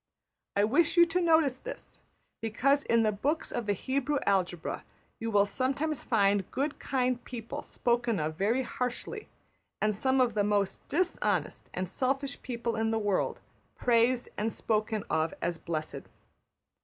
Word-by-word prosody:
I 200 - +4
wish 295 - +3
you 345 - +9
to 350 +2 0
notice 320 -6 +3
this, - - -8 0.4
because 270 +6 +2
in 230 -1 +3
the 215 - +3
books 285 +10 -1
of 240 -3 -3
the 205 - +3
Hebrew 275 +7 -1
algebra 180 -4 0 0.4
you 225 - -2
will 205 -2 +4
sometimes 275 +7 -1
find 200 -4 +2
good 285 +2 -2
kind 255 -2 0
people 230 -2 -6
spoken 240 -4 0
of 155 +1 -2
very 225 +9 +1
harshly; 250 - -4 0.5
and 215 -1 +1
some 260 +5 +1
of 245 -3 +3
the 210 -1 +2
most 200 -1 0
dishonest 360 +3 0
and 185 0 -3
selfish 270 +7 -1
people 235 -2 -3
in 225 0 +1
the 225 - +1
world 205 -3 0 0.3
praised 240 +1 +2
and 220 +2 0
spoken 215 -1 -1
of 160 +1 +1
as 170 -1 -2
blessed. 155 -3 -4
235 Hz, 155 wpm, -30 LUFS, 205-270 Hz, 0.5 s, you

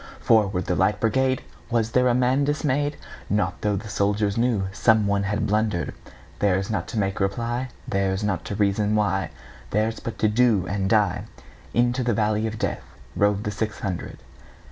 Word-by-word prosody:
"Forward, 100 -5 +2
the - - 0
Light 105 +3 +2
Brigade!"Was 120 -1 -1
there 125 +1 +3
a 120 - +3
man 130 +3 +2
dismay'd? 145 0 0 0.3
Not 100 -2 0
tho' 105 -1 +1
the 105 +3 -5
soldier 105 0 +1
knewSome 110 -1 +2
one 100 0 +1
had 105 +2 -1
blunder'd:Theirs 100 -1 -2
not 105 - -2
to - - -5
make 95 -2 0
reply, 120 +6 -1 0.2
Theirs 95 +1 0
not 95 -5 -1
to 100 - -4
reason 105 +1 +1
why, 95 -4 +1 0.4
Theirs 110 +2 0
but 115 - -6
to 110 - +2
do 105 -3 +3
and 95 0 -1
die:Into 110 - -1
the 120 -2 +1
valley 110 0 +1
of 110 0 -5
DeathRode 100 -1 -2
the 105 - -2
six 110 +1 -3
hundred. 95 -4 -4
105 Hz, 155 wpm, -24 LUFS, 100-115 Hz, 0.4 s, there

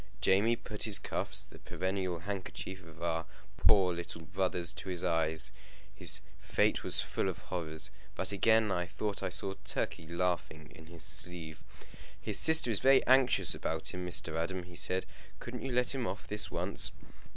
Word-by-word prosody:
Jamie 105 +5 +3
put 105 -2 -8
his 105 -3 +5
cuffs, - - +3
the - - -14
perennial 95 -2 -3
handkerchief 95 0 -6
of 80 0 -12
our 85 -1 -1 0.3
poor 95 -3 +5
little 85 -1 -5
brothers, 90 0 0
to 95 - -7
his 90 -2 -3
eyes. 80 -3 +2 0.4
His - - +3 0.2
fate - - +1
was - - +2
full - - -1
of - - -4
horrors. 80 -4 -4 0.2
But 95 - -1
again 110 +1 +3
I 90 -1 -1
thought 100 +4 -3
I - - -1
saw 95 +2 -1
Turkey 80 - -2
laughing 85 -2 -2
in 80 -1 -14
his 85 -2 -7
sleeve. 80 0 -6 0.6
"His 105 -2 +1
sister 160 -6 +5
is 105 - +1
very 135 0 +5
anxious 125 -10 +4
about 80 0 -3
him, 90 - -5
Mr. 85 -2 +1
Adam," 90 +2 -2
he 90 0 -13
said. 95 +2 +3 0.3
"Couldn't 120 0 -7
you 135 - -4
let 125 +1 +2
him 130 -3 -2
off 105 - -5
this 105 0 0
once?" - - +1
90 Hz, 175 wpm, -32 LUFS, 80-100 Hz, 0.6 s, his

